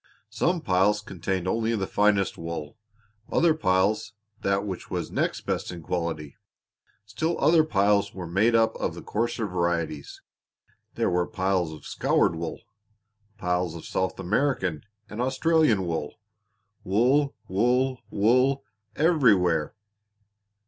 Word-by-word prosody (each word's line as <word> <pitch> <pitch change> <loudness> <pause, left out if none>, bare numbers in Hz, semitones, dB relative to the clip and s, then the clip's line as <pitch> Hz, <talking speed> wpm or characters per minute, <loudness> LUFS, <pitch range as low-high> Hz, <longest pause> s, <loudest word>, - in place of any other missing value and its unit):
Some 175 -1 0
piles 95 +1 +2
contained 95 -2 -3
only 115 +3 0
the 100 -3 -1
finest 100 -1 +2
wool; 85 -3 -6 0.6
other 165 -1 +4
piles 105 -4 +1 0.3
that 100 +1 0
which 95 -3 -6
was - - -3
next - - -1
best - - -3
in 85 -2 -8
quality; 80 -4 -3 0.7
still 160 +11 -2
other 160 -1 +5
piles 100 -6 +2
were 90 -2 -7
made 100 +8 +2
up 115 -1 +3
of - - -2
the - - -9
coarser 115 +1 -1
varieties. 85 -5 -2 0.7
There - - 0
were 90 0 +1
piles 95 -5 0
of 75 - -11
scoured 85 - +1
wool, 80 0 -5 0.8
piles 90 -3 -1
of 85 - -9
South 95 0 -2
American 95 - 0 0.3
and 105 +3 -5
Australian 130 - +2
wool 80 -3 -3 0.7
wool, 130 +9 +2
wool, 125 +6 +1
wool 130 +6 +2 0.3
everywhere! 105 - +3
100 Hz, 125 wpm, -26 LUFS, 90-120 Hz, 0.8 s, other